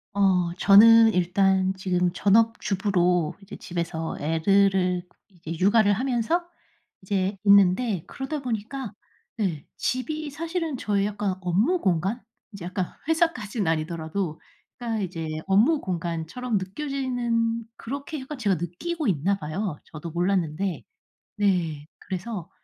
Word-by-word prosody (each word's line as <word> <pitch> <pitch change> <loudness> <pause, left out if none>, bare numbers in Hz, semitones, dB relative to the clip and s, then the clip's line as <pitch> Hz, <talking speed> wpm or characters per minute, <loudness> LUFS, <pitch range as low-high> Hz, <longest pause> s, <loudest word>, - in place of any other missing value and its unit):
어 185 -4 +2
저는 225 +3 +8
일단 190 +1 +2
지금 180 -2 0
전업주부로 195 -5 +2
이제 195 - -10
집에서 170 -2 -4
애들을 180 +3 +2 0.4
이 165 0 -5
육아를 205 +2 +4
하면서 255 - 0 0.6
이제 195 +1 -1
있는데 200 -1 +4
그러다 280 +2 -5
보니까 235 0 -4 0.4
네 180 -9 -2
집이 305 +4 -2
사실은 330 0 -3
저의 205 -3 0
약간 205 -2 -2
업무 210 - +1
공간 190 +6 0 0.3
이제 200 -4 -9
약간 180 0 -3
회사까진 315 - 0
아니더라도 160 +1 -2 0.4
그러니까 230 -3 -2
이제 165 -3 -4 0.2
업무 225 +11 +4
공간처럼 175 +6 -2
느껴지는 235 0 -1
그렇게 280 +5 -6
약간 275 +3 -7
제가 205 -6 +1
느끼고 300 - -3
있나 190 +2 +1
봐요 155 +2 -4
저도 160 +1 -8
몰랐는데. 175 0 -1 0.5
네 175 -8 0
그래서 190 -1 -5
195 Hz, 280 characters per minute, -25 LUFS, 180-230 Hz, 0.6 s, 저는